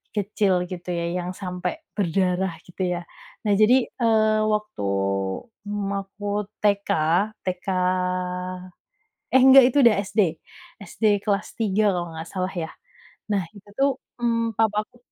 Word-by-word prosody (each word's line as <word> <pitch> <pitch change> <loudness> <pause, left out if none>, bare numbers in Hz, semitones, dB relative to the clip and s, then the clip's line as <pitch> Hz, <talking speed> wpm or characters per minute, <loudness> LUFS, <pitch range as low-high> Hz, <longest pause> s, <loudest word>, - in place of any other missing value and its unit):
kecil 195 -3 +1
gitu 180 0 -7
ya, 170 -1 -1 0.2
yang 180 - -4
sampai 185 - -4 0.2
berdarah 185 -2 0
gitu 180 +1 -5
ya. 180 -1 -1 0.5
Nah 205 - +4
jadi, 235 +5 +4
eee, 220 -2 +2
waktu, 210 - -1 0.8
mmm, 205 -1 -2
aku 205 +1 -4
TK, 200 -1 +2 0.6
TK 180 0 -3 1.7
eh 260 - +7
enggak 265 +1 +9
itu 265 - -2
udah 230 -3 +6
SD, 210 +2 +1 0.6
SD 225 - -4 0.2
kelas 205 -1 0
3 215 -4 -1 0.2
kalau 175 -1 -3
nggak 160 +1 -7
salah 185 0 -3
ya. 165 -3 -3 0.6
Nah 195 - +1
itu 205 0 -15
tuh, 275 +1 +4 0.3
mmm 230 -1 +1
papaku, 215 +1 0
200 Hz, 130 wpm, -24 LUFS, 180-215 Hz, 1.7 s, enggak